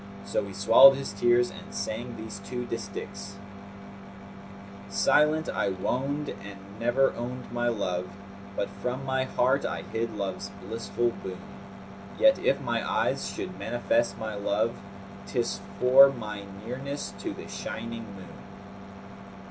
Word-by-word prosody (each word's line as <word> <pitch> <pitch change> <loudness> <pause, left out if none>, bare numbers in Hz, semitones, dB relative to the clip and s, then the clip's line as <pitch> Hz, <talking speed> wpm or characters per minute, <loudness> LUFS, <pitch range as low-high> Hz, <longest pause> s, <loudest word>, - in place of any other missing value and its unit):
So - - 0
he 100 - -8
swallowed 120 +8 +8
his 135 -7 -4
tears 120 +4 +3
and - - -11
sang 110 +3 -4
these 110 -2 -7
two 125 +5 -5
distichs, 100 -3 -6 1.5
"Silent 155 +2 +3
I - - 0
woned 135 +10 -1
and 100 0 -8 0.2
never 120 +4 +3
owned 125 +2 -6
my 120 0 0
love; 90 -6 -1 0.3
* 100 0 -15
But 100 -1 -2
from 125 +3 -2
my 130 0 +1
heart 130 +2 +2
I - - -3
hid 115 0 -3
love's 100 0 -3
blissful 115 +2 -1
boon; 95 -1 -5 0.8
Yet, - - +6
if - - +2
my - - 0
eyes - - 0
should - - -6
manifest 290 +1 +1
my 110 -1 -4
love, 105 +3 0 0.3
* 100 0 -14
'Tis 120 -4 -1 0.2
for 130 +2 +8
my 105 -6 -6 0.2
nearness 140 +4 -4
to - - -3
the - - -9
shining 115 -1 -5
moon." 95 -1 -11
115 Hz, 140 wpm, -28 LUFS, 100-130 Hz, 1.5 s, swallowed